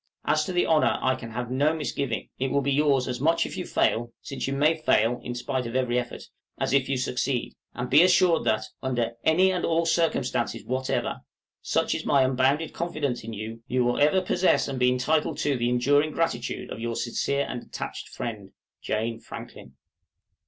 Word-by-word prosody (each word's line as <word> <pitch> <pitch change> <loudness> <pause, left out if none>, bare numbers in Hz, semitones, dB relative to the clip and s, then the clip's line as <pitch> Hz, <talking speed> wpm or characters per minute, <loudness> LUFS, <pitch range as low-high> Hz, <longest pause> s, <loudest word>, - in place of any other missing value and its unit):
As 155 0 +2
to - - -4
the 175 -1 +2
honor 155 -2 +3
I 130 - +3
can 125 -3 -7
have 120 +2 -5
no 145 +5 +2
misgiving. 140 -6 -3
It 135 +1 0
will 140 +1 +1
be 140 - 0
yours 140 -2 +2
as 125 -1 -3
much 165 +3 +3
if - - -6
you - - -4
fail 120 +1 +1
(since 135 - -4
you 135 - -1
may 150 +4 +3
fail 120 -6 +2
in 120 - -5
spite 125 0 -2
of 115 - -6
every 125 -1 +1
effort) 120 -1 -6 0.4
as - - 0
if 135 -1 +2
you 135 - +1
succeed; 125 0 -1 0.2
and 125 - -3
be 145 +5 +6
assured 180 -1 +4
that, 110 -1 +1 0.2
under 120 -3 -1
any 185 +4 +4
and 180 -1 -2
all 165 0 +1
circumstances 160 -7 0
whatever, 130 +1 -1 0.4
such - - 0
is - - -3
my 140 -2 +4
unbounded 135 +4 +1
confidence 145 -8 -2
in 115 0 -6
you, 110 +2 -6
you 125 0 +1
will 120 - +1
ever 150 +6 +4
possess 180 0 +2
and 135 -2 -4
be 125 0 +4
entitled 150 +4 +1
to 145 -2 +1
the 120 -1 0
enduring 145 +5 +3
gratitude 165 0 -2
of - - -6
your 115 0 -3
sincere 140 +4 -1
and 125 - -5
attached - - -7
friend, 105 -5 -6 0.3
JANE 115 +1 -2
FRANKLIN. - - -10
130 Hz, 195 wpm, -26 LUFS, 120-155 Hz, 0.4 s, be